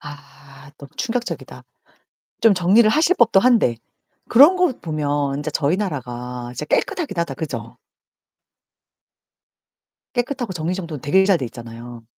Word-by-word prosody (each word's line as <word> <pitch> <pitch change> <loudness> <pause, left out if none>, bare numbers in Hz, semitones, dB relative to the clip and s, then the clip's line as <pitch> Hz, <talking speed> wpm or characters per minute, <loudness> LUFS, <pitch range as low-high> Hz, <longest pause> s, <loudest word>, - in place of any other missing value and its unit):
아 145 -1 -14
너무 140 -1 -12
충격적이다. 240 -1 -4 0.8
좀 225 -3 +5
정리를 195 +5 +4
하실 325 +8 +2
법도 225 -5 +5
한데. 230 - +3 0.5
그런 290 +10 +7
거 360 -5 +2
보면 145 -3 -2
인제 150 +1 -4
저희 150 +4 +1
나라가 125 - -5
진짜 150 - -5
깨끗하기는 235 - -1
하다. 150 -5 -3
그죠? 155 +2 -6 2.4
깨끗하고 245 -4 -2
정리정돈 170 -3 -4
되게 190 +7 +3
잘 195 -3 +3
돼 130 - -3
있잖아요. 120 0 -10
165 Hz, 280 characters per minute, -21 LUFS, 140-230 Hz, 2.4 s, 그런